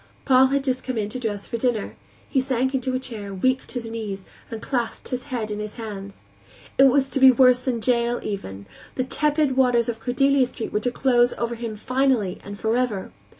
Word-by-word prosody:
Paul 260 0 +6
had 275 +1 0
just 260 -1 -1
come 255 -3 -3
in 210 -1 -1
to 255 - -5
dress 210 -4 -3
for 235 - -4
dinner; 230 -3 -1 0.3
he 270 - +1
sank 260 0 0
into 260 -1 -1
a - - 0
chair, 210 -6 -7
weak 260 +7 0
to 250 - -4
the 225 -1 -8
knees, 205 -4 -5 0.2
and 225 - -5
clasped 240 -1 -3
his 250 0 -4
head 235 -6 -4
in 210 - -3
his 210 0 -6
hands. 200 -4 -8 0.6
It 270 - +9
was 270 0 +4
to 270 - -1
be 265 0 +9
worse 255 0 +5
than 250 -3 -2
jail, 235 +1 +1
even; 100 - -5 0.3
the 255 - 0
tepid 295 0 +1
waters 245 -3 +3
of 225 -1 -4
Cordelia 260 +3 +2
Street 230 -2 -6
were 210 - +2
to 245 +3 -1
close 245 -1 +3
over 235 0 -3
him 230 -2 -5
finally 255 -4 0
and 200 0 -8
forever. 225 -3 -1
245 Hz, 210 wpm, -23 LUFS, 220-260 Hz, 0.6 s, It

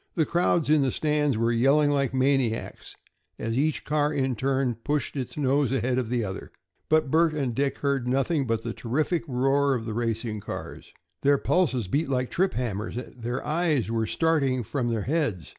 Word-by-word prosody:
The 160 - +2
crowds 170 -1 +1
in 150 0 +4
the 135 - +2
stands 150 -2 0
were 115 +1 +1
yelling 140 +5 +3
like 140 -3 +1
maniacs, 130 -3 -1 0.4
as 115 +1 -3
each 150 +3 0
car 150 0 +1
in 135 -3 0
turn 130 +1 0
pushed 145 0 -1
its 130 0 -5
nose 140 -1 +1
ahead 125 0 0
of 120 -3 -3
the 120 -1 0
other. 95 -1 -6 0.4
But 155 -3 +2
Bert 160 -1 +3
and 135 -5 -1
Dick 140 +3 -1
heard 140 -3 -1
nothing 135 +2 +1
but 115 -1 -1
the 115 -1 -4
terrific 150 +10 -1
roar 135 +2 +2
of 115 -2 -4
the 110 - -4
racing 115 -1 -2
cars. - - -8 0.3
Their 140 0 +4
pulses 135 - +1
beat 145 - 0
like 125 -2 -1
trip 190 +2 +1
hammers; 110 -4 -3 0.2
their 120 +2 -4
eyes 150 -7 0
were 110 -1 0
starting 140 -4 +1
from 120 +2 -2
their 115 -3 -1
heads. 140 - -1
135 Hz, 185 wpm, -26 LUFS, 120-150 Hz, 0.4 s, in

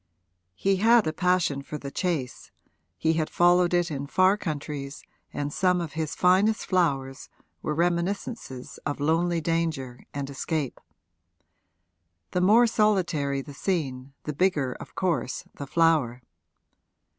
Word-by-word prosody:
He 195 - +1
had 225 +2 +5
a 155 - -1
passion 180 -5 +1
for 145 +2 -6
the 140 -1 -7
chase, 160 -9 -3 0.5
he 160 - +2
had 160 -1 -1
followed 175 0 +4
it 175 -1 +1
in 140 -1 -4
far 185 +5 +4
countries 145 -6 -5 0.3
and 145 0 -3
some 180 -1 +2
of 165 -3 -5
his 160 -2 -3
finest 195 +5 +3
flowers 140 -8 0 0.3
were 150 - -2
reminiscences 170 - -2
of 145 -1 -3
lonely 165 +3 +1
danger 155 -7 -2
and 140 -1 -4
escape. 140 0 -3 1.5
The 180 - 0
more 215 +6 +6
solitary 170 -11 +1
the 145 - -10
scene 135 -6 -3
the 150 - -4
bigger 145 -6 +1
of - - -11
course 170 -8 -1
the 140 - -7
flower. 150 -7 +2
160 Hz, 135 wpm, -26 LUFS, 140-180 Hz, 1.5 s, more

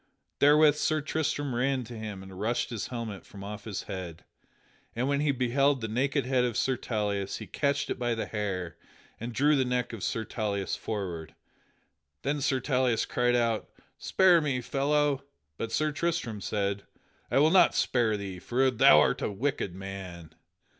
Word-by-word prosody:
Therewith 150 +1 +6
Sir 155 +1 +1
Tristram 145 -2 -2
ran 130 +2 0
to 120 +1 -9
him 105 -3 -6
and 95 -1 -11
rushed 120 +3 -1
his 115 -4 -3
helmet 115 -5 -5
from 100 -1 -11
off 105 +1 -7
his 105 -4 -4
head. 90 -3 -7 0.7
And 125 +3 0
when 140 0 +1
he 150 0 +2
beheld 135 +2 +2
the 110 - -3
naked 135 +4 0
head 130 -1 +2
of 120 -3 -1
Sir 130 - +1
Tauleas 105 -5 -2
he - - -7
catched 140 -1 -1
it - - -3
by 120 -1 0
the 115 - -2
hair 95 -6 -3 0.4
and 115 +2 -5
drew 145 +5 +3
the 135 - +3
neck 125 -1 -1
of 110 - -6
Sir 110 +3 -2
Tauleas 100 -3 -2
forward. 90 -7 -5 0.9
Then 145 0 -1
Sir 130 0 +1
Tauleas 125 -3 +1
cried 125 0 +1
out, 115 -2 0 0.3
"Spare 180 -3 +4
me, 140 -4 0
fellow!" 140 +2 +1 0.3
But 115 +7 -4
Sir 155 0 +1
Tristram 150 -10 -2
said, 100 -1 -1 0.5
"I - - +1
will 155 +3 +5
not 180 -2 +5
spare 115 -4 +2
thee 95 -3 -6
for 130 +7 +1
thou 95 -10 +7
art - - +2
a - - -1
wicked 115 -4 -2
man!" 95 -4 -8
120 Hz, 175 wpm, -29 LUFS, 100-140 Hz, 0.9 s, thou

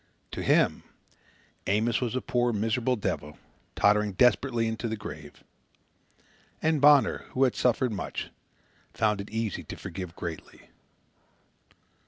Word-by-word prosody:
To - - -4
him, - - +3 0.9
Amos 110 +4 +1
was 125 -1 -2
a 130 - 0
poor, 120 0 +1
miserable 115 +4 0
devil, 75 -8 -4 0.4
tottering 105 0 +3
desperately 120 +2 +3
into 110 +1 -3
the 110 - -2
grave. 105 - -10 1.2
And 155 -2 +1
Bonner, 145 -1 +5
who 130 - +2
had 130 - +2
suffered 125 0 +1
much, 100 - -5 0.6
found 105 -2 +1
it 100 - -9
easy 110 -2 -2
to - - -7
forgive 90 -2 -7
greatly. 85 -2 -8
115 Hz, 125 wpm, -28 LUFS, 105-125 Hz, 1.2 s, Bonner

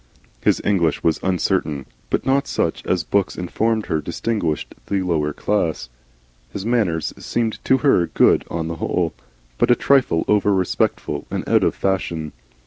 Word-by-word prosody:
His - - +2
English 85 -6 +1
was 80 -1 +2
uncertain, 90 -6 0 0.2
but - - -1
not 140 +1 +2
such - - -1
as 90 -3 +1
books 100 +3 0
informed 110 +5 0
her 80 -4 -1
distinguished 85 -3 -2
the 100 -1 0
lower 80 -4 0
classes. 80 -8 -1 0.6
His 100 +5 -5
manners 105 -10 0
seemed 115 -2 -2
to 130 - +4
her 90 -11 +4
good - - +3
on 80 -1 -3
the 85 0 -4
whole, - - -1 0.5
but 120 - +3
a 120 - +7
trifle 130 -14 +2
over 105 -1 +3
respectful 85 -5 -1
and - - -4
out - - +4
of - - +1
fashion. 85 -5 -1
95 Hz, 155 wpm, -21 LUFS, 80-105 Hz, 0.6 s, a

